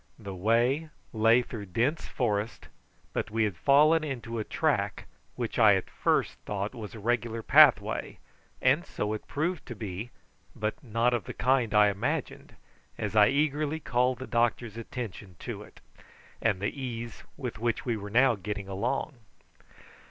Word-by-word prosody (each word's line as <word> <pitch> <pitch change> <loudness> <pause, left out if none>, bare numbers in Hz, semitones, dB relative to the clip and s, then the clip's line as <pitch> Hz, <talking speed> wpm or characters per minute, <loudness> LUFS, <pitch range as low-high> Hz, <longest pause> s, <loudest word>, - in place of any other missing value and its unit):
The 100 -3 -7
way 120 - +1 0.2
lay 115 +2 +4
through 110 -4 -7
dense 125 - 0
forest, 110 -2 -2 0.4
but - - -2
we 110 +1 +1
had 105 -4 0
fallen 155 - +5
into 120 -5 -4
a - - -1
track - - -1 0.3
which - - -3
I - - +7
at - - -3
first - - 0
thought 100 0 -3
was 110 -2 -8
a - - -8
regular 115 0 -1
pathway, - - +5 0.5
and 140 +7 +4
so 105 - -3
it 110 - -6
proved 165 +4 -2
to 120 - -6
be, 105 +2 -5 0.5
but 110 +8 -3
not 115 +1 +1
of 120 - -1
the - - -7
kind 125 -4 +2
I 105 0 +7
imagined 100 0 -3 0.4
as 105 0 -3
I 105 -1 +7
eagerly 150 +3 0
called 125 -3 +1
the 130 - -6
doctor's 120 -2 0
attention 110 -5 -7
to - - -5
it, - - -15 0.6
and 110 -5 +1
the 100 - -1
ease 120 -3 -5
with 125 -5 -5
which 115 -1 -1
we 120 -3 0
were 105 -1 -6
now 125 +4 +5
getting 100 0 -5
along. 120 +8 -2
115 Hz, 160 wpm, -29 LUFS, 105-130 Hz, 0.6 s, I